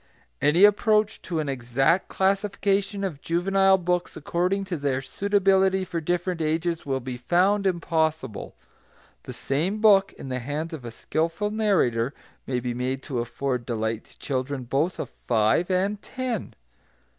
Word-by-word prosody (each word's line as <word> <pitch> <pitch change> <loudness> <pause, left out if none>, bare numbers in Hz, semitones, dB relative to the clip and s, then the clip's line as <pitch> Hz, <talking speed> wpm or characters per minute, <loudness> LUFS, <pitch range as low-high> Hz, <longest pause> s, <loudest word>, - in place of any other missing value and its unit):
Any 165 +6 +4
approach 210 +1 +3
to 170 -3 -3
an 155 - -2
exact 135 +6 +1
classification 200 +1 0
of 160 -8 -4
juvenile 195 +3 +3
books 180 -1 -1
according 180 +6 -1
to 185 -3 -3
their 140 -2 0
suitability 190 +3 +2
for 170 -2 -3
different 175 +1 -1
ages 160 +1 -1
will 135 -1 0
be 125 -1 -6
found 190 +9 +2
impossible. 160 - -1 0.7
The - - -7
same 170 +10 -1
book 200 -2 +5
in 135 - -9
the 125 0 -2
hands 150 +6 -4
of 140 -6 -7
a - - -4
skilful 165 - -2
narrator 155 - +1 0.3
may 125 -2 0
be 120 0 -3
made 130 +2 -3
to 130 -4 -3
afford 125 +1 -2
delight 110 -2 -2
to - - -19
children 130 0 -3
both 140 +9 0
of - - -4
five 115 - +1
and 195 +3 0
ten. 255 -5 -4
170 Hz, 150 wpm, -25 LUFS, 135-195 Hz, 0.7 s, book